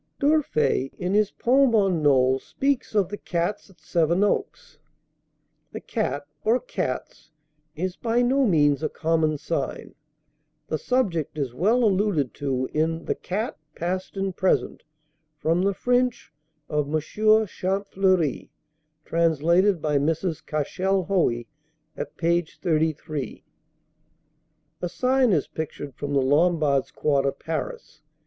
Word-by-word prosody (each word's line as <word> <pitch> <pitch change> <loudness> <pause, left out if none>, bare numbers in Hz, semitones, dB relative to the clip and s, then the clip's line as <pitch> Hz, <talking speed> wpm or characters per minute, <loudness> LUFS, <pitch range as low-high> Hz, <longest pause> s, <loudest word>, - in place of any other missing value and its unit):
D'Urfey, 155 - +2
in 180 +1 -2
his 210 -1 +3
poem 260 0 +3
on 195 -6 +2
Knole, 130 -2 +4
speaks 275 - -2
of 195 -4 +2
"The 205 - -6
Cats" 175 +4 -2
at 180 -4 -21
Sevenoaks. 175 - 0 0.9
"The - - -4
Cat" 205 - -3 0.2
or 230 +3 +3
"Cats" - - -5 0.5
is 180 +3 -3
by 235 +1 +1
no 270 +3 +3
means 145 -6 +3
a 155 - -1
common 160 -1 0
sign. 145 -2 -4 0.8
The 155 - -1
subject 180 - -1
is 135 -5 -2
well 215 - +2
alluded 195 - +1
to 130 -2 -2
in 160 +2 0
"The - - 0
Cat, 205 -1 -4 0.2
Past 185 +3 -3
and 195 -1 -2
Present," 185 - 0 0.6
from 165 +3 +1
the 200 +1 +2
French 250 +1 0 0.3
of 150 -2 -1
M. 155 - +2
Champfleury, 195 - +1 0.6
translated 170 +3 +2
by 150 -2 +2
Mrs. 165 +3 -1
Cashel 185 +6 -1
Hoey, 165 -11 +1 0.5
at - - -6
page 170 -1 0
33. 155 -4 -2 1.4
A 175 - -2
sign 255 +3 +2
is 155 -7 +2
pictured 145 -3 -6
from 145 +3 -5
the 135 - +3
Lombards' 145 -1 +2
quarter, 140 -2 +1
Paris. 155 +1 -6
170 Hz, 125 wpm, -25 LUFS, 150-205 Hz, 1.4 s, Knole